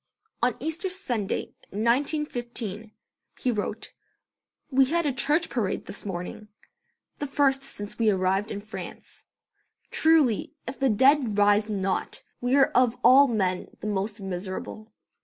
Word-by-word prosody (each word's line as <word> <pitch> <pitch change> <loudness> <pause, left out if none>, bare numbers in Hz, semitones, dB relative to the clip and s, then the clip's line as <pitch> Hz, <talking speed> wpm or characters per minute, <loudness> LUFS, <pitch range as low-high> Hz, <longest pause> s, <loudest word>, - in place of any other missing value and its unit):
On - - +1
Easter 320 +4 -2
Sunday, 245 - -2 0.2
1915, 235 - -1 0.5
he 255 - +1
wrote: 215 0 -4 0.8
"We 265 0 +5
had 335 +4 0
a 285 - +1
church 300 +6 +2
parade 220 -7 -2
this 205 - -5
morning, 185 +3 -5 0.7
the 290 - -2
first 275 -1 +2
since 210 -7 -6
we 225 -1 +4
arrived 190 +1 +1
in 205 - -5
France. 215 +2 -9 0.7
Truly, 315 -9 +3
if 255 - -6
the 270 -1 +3
dead 260 -1 +4
rise 205 +1 +4
not, 195 -2 -2 0.2
we 245 +2 +2
are 275 -1 +5
of 250 -1 +3
all 265 +4 +8
men 190 -6 -1
the - - -8
most 205 +1 -2
miserable." 195 +3 -6
230 Hz, 135 wpm, -26 LUFS, 205-275 Hz, 0.8 s, all